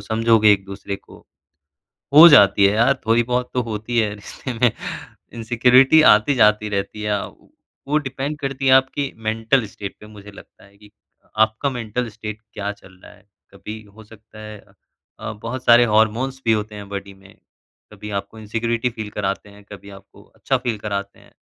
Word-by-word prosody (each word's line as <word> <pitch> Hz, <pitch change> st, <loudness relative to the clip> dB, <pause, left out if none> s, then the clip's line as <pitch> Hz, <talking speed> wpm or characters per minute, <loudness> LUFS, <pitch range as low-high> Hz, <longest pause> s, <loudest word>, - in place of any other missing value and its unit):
समझोगे 110 Hz, 0 st, +3 dB
एक-दूसरे 100 Hz, 0 st, -4 dB
को, -, -, -18 dB, 1.0 s
हो 155 Hz, +4 st, +10 dB
जाती 100 Hz, -8 st, +6 dB
है 100 Hz, -, +4 dB
यार, 115 Hz, +4 st, +3 dB
थोड़ी 115 Hz, +2 st, +3 dB
बहुत 125 Hz, +1 st, -2 dB
तो 125 Hz, -, 0 dB
होती 110 Hz, +1 st, -4 dB
है 105 Hz, -2 st, 0 dB
रिश्ते 115 Hz, +5 st, -8 dB
में। 120 Hz, 0 st, +2 dB, 0.6 s
इनसिक्योरिटी 125 Hz, +5 st, +4 dB
आती-जाती 105 Hz, -2 st, +3 dB
रहती 100 Hz, +1 st, -4 dB
है, 105 Hz, -1 st, -1 dB, 0.7 s
वो 150 Hz, -, +1 dB
डिपेंड 135 Hz, +2 st, -5 dB
करती 135 Hz, -1 st, -4 dB
है -, -, +5 dB
आपकी 135 Hz, +1 st, +1 dB, 0.2 s
मेंटल 115 Hz, +3 st, +1 dB
स्टेट 100 Hz, -1 st, -9 dB
पे 105 Hz, -, -14 dB
मुझे 105 Hz, -1 st, -13 dB
लगता 100 Hz, -, -17 dB
है 100 Hz, 0 st, -23 dB
कि 105 Hz, 0 st, -19 dB, 0.5 s
आपका 110 Hz, +5 st, +1 dB
मेंटल 120 Hz, -1 st, -4 dB
स्टेट 110 Hz, 0 st, -8 dB
क्या 100 Hz, 0 st, -4 dB
चल 100 Hz, -2 st, -17 dB
रहा -, -, -13 dB
है? -, -, -24 dB, 0.3 s
कभी 105 Hz, +3 st, -9 dB
हो 110 Hz, -, -14 dB
सकता 110 Hz, 0 st, -17 dB
है 105 Hz, 0 st, -9 dB, 0.6 s
अ, -, -, -5 dB
बहुत 115 Hz, +4 st, -7 dB
सारे 120 Hz, +1 st, +6 dB
हॉर्मोन्स 115 Hz, +5 st, 0 dB
भी 115 Hz, -, +3 dB
होते 105 Hz, 0 st, -3 dB
हैं 100 Hz, -1 st, -9 dB
बॉडी 100 Hz, 0 st, -7 dB
में, 95 Hz, 0 st, -19 dB, 0.6 s
कभी 105 Hz, +1 st, -10 dB
आपको 110 Hz, +2 st, -13 dB
इनसिक्योरिटी 115 Hz, +3 st, -2 dB
फ़ील 110 Hz, -3 st, -7 dB
कराते 100 Hz, 0 st, -4 dB
हैं, 100 Hz, 0 st, -17 dB
कभी 100 Hz, 0 st, -11 dB
आपको 100 Hz, -1 st, -16 dB
अच्छा 135 Hz, -, -1 dB
फ़ील 120 Hz, -3 st, -3 dB
कराते 100 Hz, -1 st, -5 dB
हैं। -, -, -22 dB
110 Hz, 175 wpm, -20 LUFS, 105-120 Hz, 1.0 s, हो